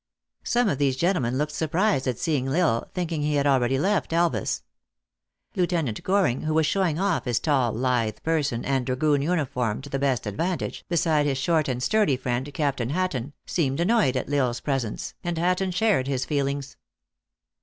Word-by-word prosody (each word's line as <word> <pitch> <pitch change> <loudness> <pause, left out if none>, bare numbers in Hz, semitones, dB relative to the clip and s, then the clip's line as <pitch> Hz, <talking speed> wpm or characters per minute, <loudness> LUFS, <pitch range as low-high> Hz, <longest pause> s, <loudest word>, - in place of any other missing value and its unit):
Some 245 -1 +2
of 140 - 0
these 135 -2 +2
gentlemen 130 -6 0
looked 150 +2 -1
surprised 160 0 0
at 125 -3 -1
seeing 145 -6 0
L 135 - -1
Isle, 115 - -2
thinking 170 -4 -2
he 150 0 0
had 140 0 +1
already 135 -2 +3
left 185 0 0
Elvas. 170 0 0 0.9
Lieutenant 170 - 0
Goring, 185 -10 +1
who 155 0 -1
was 160 -1 +3
showing 175 -2 +1
off 195 -3 0
his 120 -2 +1
tall 130 -5 +1
lithe 115 -3 0
person 145 -7 0
and 135 -2 +1
dragoon 140 +3 +1
uniform 140 -9 -1
to 145 - -10
the 135 - -1
best 135 -4 0
advantage, 165 - -3
beside 160 -3 +2
his 135 -2 0
short 155 +3 +1
and 125 -1 -2
sturdy 210 -10 +2
friend, 130 +2 -2
Captain 140 -5 -1
Hatton, 150 -5 -2
seemed 140 -5 -1
annoyed 180 - +2
at - - -3
L 140 -2 +3
Isle - - 0
s 120 - -5
presence, 135 -7 -3
and 175 -1 -2
Hatton 180 +3 +1
shared 180 -7 +1
his 130 -2 -1
feelings. 140 -1 -2
145 Hz, 180 wpm, -25 LUFS, 130-170 Hz, 0.9 s, already